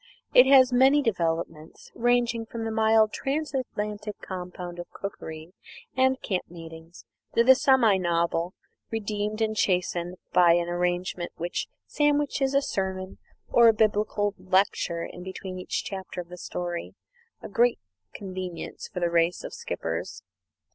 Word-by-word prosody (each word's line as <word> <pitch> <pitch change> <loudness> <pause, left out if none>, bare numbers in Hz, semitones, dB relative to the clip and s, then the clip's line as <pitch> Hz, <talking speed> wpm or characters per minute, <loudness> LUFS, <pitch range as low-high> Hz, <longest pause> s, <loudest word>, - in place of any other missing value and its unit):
It 250 +1 +8
has 260 -2 +6
many 270 +4 +5
developments; 165 - -3
ranging 240 -1 +1
from 230 0 -5
the 225 - -2
mild 220 -1 +3
Transatlantic 235 -8 -3
compound 180 -1 -7
of 175 - -7
cookery 160 -4 -8 0.4
and 260 0 +3
camp 185 -3 -2
meetings, 165 0 -11 0.3
to 235 - +5
the 260 +2 +8
semi 255 -6 +4
novel, 170 0 0 0.3
redeemed 215 -1 -3
and 220 0 +1
chastened 180 -2 0 0.2
by 175 -2 +6
an 175 0 +1
arrangement 175 0 -2
which 175 +2 -3 0.2
sandwiches 290 -2 +1
a 275 - +4
sermon 190 -3 -3 0.3
or 235 -1 +6
a 225 - +7
biblical 210 -1 +1
lecture 185 -3 +1 0.2
between 190 0 -7
each 185 - -3
chapter 190 -2 -6
of 175 -1 -6
the 180 - -9
story 175 -1 -5 0.5
a - - -5
great 235 +4 +2 0.3
convenience 185 -3 -6
for 180 - -5
the 170 -1 +1
race 170 +1 +2
of - - -7
skippers. 470 +1 -5
195 Hz, 135 wpm, -26 LUFS, 175-235 Hz, 0.5 s, It